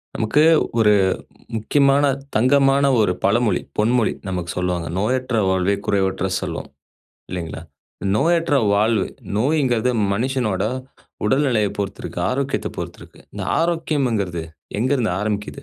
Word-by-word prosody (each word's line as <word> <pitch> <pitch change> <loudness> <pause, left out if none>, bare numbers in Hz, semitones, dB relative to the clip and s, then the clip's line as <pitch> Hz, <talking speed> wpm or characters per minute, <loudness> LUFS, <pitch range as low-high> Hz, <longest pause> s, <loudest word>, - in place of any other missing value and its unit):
நமக்கு 115 +7 +2 0.4
1 105 -1 +5 0.6
முக்கியமான 140 +5 +3 0.3
தங்கமான 135 +3 +4 0.2
1 105 -4 +3
பழமொழி, 110 +3 +2 0.2
பொன்மொழி 115 +2 +2 0.2
நமக்கு 90 -2 -3
சொல்லுவாங்க. 90 -2 -1
"நோயற்ற 125 +4 0
வாழ்வே 95 +1 +2
குறைவற்ற 95 -2 0
செல்வம்" - - -5 0.6
இல்லைங்களா? 85 -3 -5 0.5
நோயற்ற 165 +3 +2 0.2
வாழ்வு, 110 +2 +2 0.3
நோய்ங்கறது 125 -1 +2 0.2
மனுஷனோட 120 -2 -1 0.6
உடல்நிலையைப் 120 -3 +2
பொறுத்து 100 0 -3
இருக்கு. - - -5
ஆரோக்கியத்தப் 135 +1 -2
பொறுத்து - - -6
இருக்கு. - - -15
இந்த - - -6 0.2
ஆரோக்கியம்ங்கிறது 135 - 0 0.4
எங்கிருந்து 125 -5 +1
ஆரம்பிக்கிது? 105 +5 -3
110 Hz, 110 wpm, -21 LUFS, 100-135 Hz, 0.6 s, 1